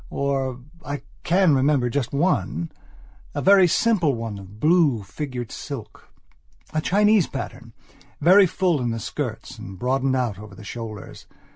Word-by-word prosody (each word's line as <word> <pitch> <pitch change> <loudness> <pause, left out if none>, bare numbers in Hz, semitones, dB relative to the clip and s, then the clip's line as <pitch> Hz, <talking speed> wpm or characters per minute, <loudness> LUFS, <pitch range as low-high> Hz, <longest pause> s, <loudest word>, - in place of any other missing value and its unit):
Or 135 -2 -1 0.2
I 145 0 -5 0.2
can 180 -1 +3
remember 135 -1 +3
just 140 -3 -1
one, 125 - 0 0.6
a - - -1
very 195 -1 +7
simple 175 - +2
one 115 -3 -5
of 100 +2 -13
blue 155 - +3
figured 120 +4 -5
silka 135 -7 -8 0.8
Chinese 205 +1 +3
patternvery 140 - 0
full 175 -7 +1
in 120 - -1
the 115 0 -2
skirts 120 0 -5
and 95 -3 -9
broadening 130 +4 +1
out 120 -6 -1
over 105 -2 -11
the 105 - -12
shoulders. 110 -1 -8
130 Hz, 135 wpm, -23 LUFS, 115-155 Hz, 0.8 s, very